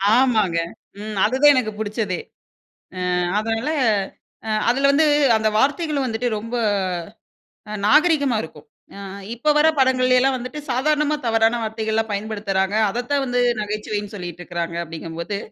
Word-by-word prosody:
ஆமாங்க. 220 -9 +2 0.4
ம் 215 -1 -6
அதுதான் 265 +6 +5
எனக்கு 240 -4 0
புடிச்சதே. 210 -3 -2 0.9
அ - - +1 0.2
அதனால 225 +4 -2 0.8
அ - - -1 0.2
அதில 270 +3 +3
வந்து 310 +3 +4 0.3
அந்த 220 0 +1
வார்த்தைகளும் 290 +2 +1
வந்துட்டு 235 +1 -1
ரொம்ப 230 +3 -7 1.2
அ - - -5
நாகரீகமா 285 -1 +4
இருக்கும். 155 -2 -11 0.3
அ - - -9 0.4
இப்போ 250 +6 0
வர 305 +1 +5
படங்கள்ளயெல்லாம் 260 0 +3
வந்துட்டு 255 +4 -6
சாதாரணமா 300 +4 +1
தவறான 225 +1 +2
வார்த்தைகள்லாம் 220 0 -2
பயன்படுத்துறாங்க. 200 -2 -2 0.2
அதைத்தான் 245 +5 -1
வந்து 245 -1 0 0.2
நகைச்சுவைன்னு 210 0 -4
சொல்லிட்டிருக்கிறாங்க 175 -2 -5
அப்படிங்கும்போது, 165 +4 -6
225 Hz, 120 wpm, -21 LUFS, 210-265 Hz, 1.2 s, அதுதான்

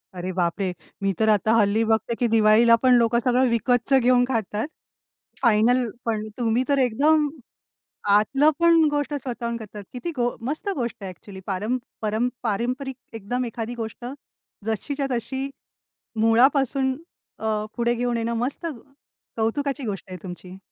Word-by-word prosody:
अरे 180 +1 -4
बापरे! 180 +1 -1 0.3
मी 195 - +2
तर 220 0 +3
आता, 215 +1 +3
हल्ली 220 0 +3
बघते 225 +1 +1
की 245 - +2
दिवाळीला 225 +1 +5
पण 255 -1 +6
लोकं 235 -1 +4
सगळं 250 +2 +2
विकतचं 245 +3 +2
घेऊन 245 0 +4
खातात, 225 -2 -2 0.7
फायनल 235 +1 +3 0.2
पण. 215 -2 -1
तुम्ही 235 +1 +2
तर 280 - +3
एकदम 295 +5 +3 0.8
आतलं 270 +9 +4
पण 335 -1 +6
गोष्ट 290 0 -1
स्वतःहून 240 -4 -3
करतात, 210 -2 -9
किती 255 +7 -4
गो 245 -1 0
मस्त 310 +8 -3
गोष्ट 240 -3 -2
आहे 195 - -4
अ‍ॅक्चुअली. 190 +1 -11
पारम 210 +5 -1 0.3
पर 215 0 -1 0.2
पारंपरिक 250 +5 -2 0.2
एकदम 235 +4 -3
एखादी 235 0 -5
गोष्ट 225 0 -6 0.6
जशीच्या 275 +6 -2
तशी 265 +3 -2 0.7
मुळापासून 265 +3 +3 0.4
अ, 215 -1 -1
पुढे 235 0 +2
घेऊन 240 0 -1
येणं. 230 0 -1
मस्त, 255 +8 -2 0.7
कौतुकाची 275 +5 -1
गोष्ट 200 -4 -4
आहे 185 - -6
तुमची. 180 0 -9
235 Hz, 140 wpm, -24 LUFS, 215-260 Hz, 0.8 s, पण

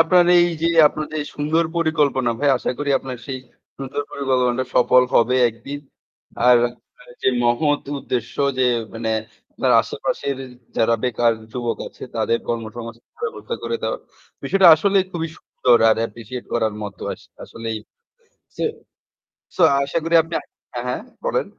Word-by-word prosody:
আপনার 175 +2 +5
এই 175 0 +6 0.2
যে - - +3 0.2
আপনার 155 0 -5
যে - - -1 0.2
সুন্দর 155 +3 +1
পরিকল্পনা 150 -6 +2
ভাই 145 - +2
আশা - - -2
করি 145 -1 -1
আপনার 130 -1 -6
সেই 135 -2 -4 0.4
সুন্দর 135 +1 -4
পরিকল্পনাটা 130 -2 0
সফল 125 +1 +5
হবে 125 +2 +4
একদিন। 120 +6 -7 0.7
আর 125 -1 +8 0.7
যে - - +3
আ - - 0
মহৎ 145 +5 +2 0.2
উদ্দেশ্য 125 -3 -3 0.2
যে 130 - +4 0.3
মানে 115 0 -2 0.4
আপনার - - +1
আশেপাশের 140 -1 -3 0.4
যারা 115 +1 +3
বেকার 120 -2 +2 0.2
যুবক 120 -2 -2
আছে - - -13
তাদের 115 - +1
কর্ম 115 -1 -1
সমাজ 115 -1 -6 0.3
ব্যবস্থা 465 +1 -4
করে 465 - -1
দেওয়া। - - -1 0.4
বিষয়টা 195 -2 +5
আসলেই 195 +4 +2
খুবই 165 -1 -3
সুন্দর 120 -2 +2
আর 110 - +4
অ্যাপ্রিশিয়েট 115 +2 -5
করার 110 -3 0
মতো। 100 -3 -7
আস - - -11 0.2
আসলেই 115 -1 -5 0.8
সো - - -3 0.9
সো - - -1 0.2
আশা 140 +4 -2
করি 165 +1 +1
আপনি 165 +1 -10 0.4
হ্যাঁ, 120 - -4
হ্যাঁ, 125 - -2 0.2
বলেন। - - 0
130 Hz, 150 wpm, -21 LUFS, 120-160 Hz, 0.9 s, আর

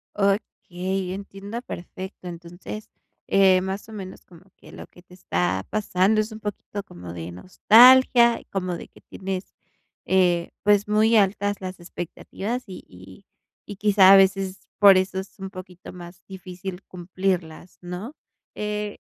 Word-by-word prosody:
Okey, 190 -2 -2
entiendo 200 +3 -7
perfecto. 185 -3 -9
Entonces, 175 +5 -9 0.4
eh, 190 -2 +5
más 190 +2 -5
o - - -10
menos 190 -3 -8
como 175 0 -18
que - - -17
lo - - -10
que 175 - -19
te 180 0 -20
está 95 - -2
pasando 210 0 +1
es 215 +1 -5
un 220 - -9
poquito 205 -1 -6
como 90 - -10
de 85 0 -7
nostalgia, 235 - +6
como 185 -2 -2
de - - -10
que - - -21
tienes, 190 0 -6 0.5
eh, 180 -2 +2
pues 205 0 +3
muy 215 +2 +4
altas 205 0 +1
las 185 0 -6
expectativas 190 +7 -6
y 185 - -9
y 95 - -15 0.4
y 205 - -6
quizá 195 -1 +6
a - - +10
veces 195 0 +2
por 200 -2 +8
eso 190 0 -1
es 190 +3 -10
un 190 0 -6
poquito 185 -1 -11
más 175 0 -12
difícil 185 -1 -8
cumplirlas, 180 -2 -4
¿no? 180 - -7 0.4
Eh 210 0 -4
190 Hz, 145 wpm, -24 LUFS, 180-205 Hz, 0.5 s, a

